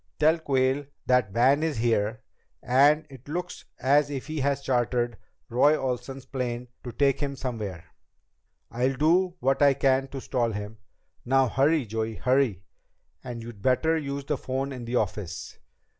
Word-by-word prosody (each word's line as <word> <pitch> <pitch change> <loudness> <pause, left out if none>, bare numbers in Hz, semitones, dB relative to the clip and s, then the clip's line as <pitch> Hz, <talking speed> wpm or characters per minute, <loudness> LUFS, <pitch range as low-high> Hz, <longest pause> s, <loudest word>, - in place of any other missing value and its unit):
Tell 160 +2 +4
Quayle 135 -1 +1 0.2
that 125 -5 +3
Van 130 +8 +3
is 160 -5 -1
here 110 0 0 0.4
and 145 +5 +4
it 130 0 -13
looks 175 +4 -5
as 145 +2 +3
if 135 -3 -4
he 155 0 -4
has 140 0 0
chartered 120 -2 0 0.3
Roy 145 +6 +4
Olsen's 130 +1 -4
plane 125 -2 -4
to 120 - -6
take 135 +3 +2
him 140 -2 -2
somewhere. 110 -10 -5 0.9
I'll 130 +3 0
do 175 +6 +2
what 135 +2 +1
I 140 -1 +6
can 135 0 +2
to 135 0 -7
stall 120 -3 -1
him. 105 +2 -6 0.4
Now 135 +1 +3
hurry, 145 +2 +2
Joey! 110 +1 -3
Hurry! 125 -3 +1 0.6
And 120 -2 -6
you'd 115 -4 -10
better 135 +8 +2
use 140 -3 -3
the 150 0 -1
phone 135 +2 -3
in 125 -3 -6
the 120 +2 -3
office." 95 -7 -3
130 Hz, 160 wpm, -26 LUFS, 120-140 Hz, 0.9 s, I